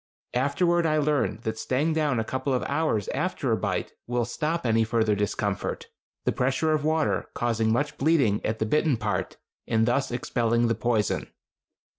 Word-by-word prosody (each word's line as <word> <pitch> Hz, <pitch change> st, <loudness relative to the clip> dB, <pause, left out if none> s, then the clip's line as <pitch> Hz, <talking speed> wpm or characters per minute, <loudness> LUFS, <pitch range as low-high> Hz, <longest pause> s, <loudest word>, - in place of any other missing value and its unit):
Afterward 165 Hz, +6 st, +2 dB
I 155 Hz, 0 st, +2 dB
learned 145 Hz, -7 st, 0 dB
that 110 Hz, 0 st, -3 dB
staying 145 Hz, +5 st, 0 dB
down 150 Hz, -6 st, +1 dB
a -, -, +1 dB
couple 130 Hz, +3 st, -1 dB
of 125 Hz, -, -1 dB
hours 115 Hz, -, 0 dB
after -, -, -1 dB
a -, -, +4 dB
bite -, -, -2 dB, 0.2 s
will 120 Hz, -1 st, 0 dB
stop 155 Hz, +5 st, -2 dB
any 115 Hz, -1 st, +3 dB
further 110 Hz, -1 st, +1 dB
discomfort, 100 Hz, -1 st, -2 dB, 0.4 s
the -, -, +3 dB
pressure 135 Hz, +5 st, +1 dB
of 150 Hz, -2 st, 0 dB
water 155 Hz, 0 st, 0 dB
causing 115 Hz, -2 st, +1 dB
much 145 Hz, +5 st, -1 dB
bleeding 135 Hz, -9 st, +2 dB
at 110 Hz, -, -1 dB
the 110 Hz, -, -1 dB
bitten 150 Hz, +2 st, +2 dB
part, 105 Hz, -1 st, -2 dB, 0.3 s
and 110 Hz, -1 st, +2 dB
thus 125 Hz, +3 st, +1 dB
expelling 120 Hz, -1 st, +1 dB
the 115 Hz, -, +2 dB
poison. 115 Hz, -1 st, 0 dB
125 Hz, 170 wpm, -26 LUFS, 110-150 Hz, 0.4 s, a